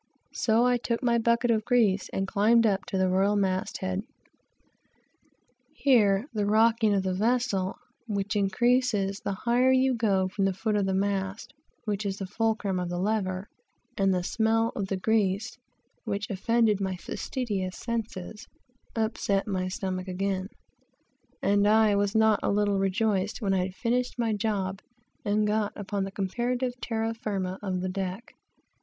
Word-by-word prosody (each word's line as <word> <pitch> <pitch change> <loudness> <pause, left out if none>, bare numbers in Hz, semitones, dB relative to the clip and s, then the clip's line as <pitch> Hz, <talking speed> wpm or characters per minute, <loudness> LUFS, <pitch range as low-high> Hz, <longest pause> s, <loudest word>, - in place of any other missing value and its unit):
So 230 +1 +2
I 250 0 +3
took 235 +1 -2
my 235 -1 +3
bucket 235 +1 +2
of 220 -1 +1
grease 210 -5 +2
and 195 0 -2
climbed 225 +4 +4
up 200 -3 +1
to 195 - -2
the 190 0 +2
royal 195 +3 +2
mast 195 0 -1
head. 185 0 -1 1.7
Here 215 -6 +3
the 210 -2 0
rocking 220 0 +3
of 195 - +1
the 190 -1 -1
vessel, 210 -2 0 0.3
which 205 0 -2
increases 205 0 +1
the 200 - -3
higher 240 +5 +2
you 260 0 +3
go 200 -5 +1
from 195 +1 -1
the 195 -1 0
foot 215 +2 -1
of 200 -2 +1
the 190 - 0
mast, 195 +5 -2 0.3
which 210 -1 -2
is 195 -1 -3
the 195 - -4
fulcrum 205 -2 -1
of 180 -1 -3
the 175 - -3
lever, 190 -1 -1 0.5
and 195 -1 +2
the 180 -1 0
smell 225 +3 +1
of 195 - -2
the 195 - -2
grease, 215 +3 0 0.4
which 205 -2 -3
offended 215 +1 +2
my 190 -1 -1
fastidious 195 -1 -4
senses, 220 -2 -5 0.5
upset 215 -3 0
my 185 -3 -2
stomach 185 0 -4
again, 190 0 -2 1.0
and 205 +1 +3
I 215 -1 +4
was 200 +1 0
not 220 -1 +4
a - - 0
little 205 -1 +1
rejoiced 195 +1 0
when 200 -4 0
I 185 0 0 0.6
got 210 +1 -2
upon 200 -1 -3
the 195 - -6
comparative 245 +6 -1
terra 225 -1 -1
firma 195 -4 -3
of 185 -3 -2
the 185 - -2
deck. 190 +3 -5
205 Hz, 150 wpm, -27 LUFS, 190-225 Hz, 1.7 s, climbed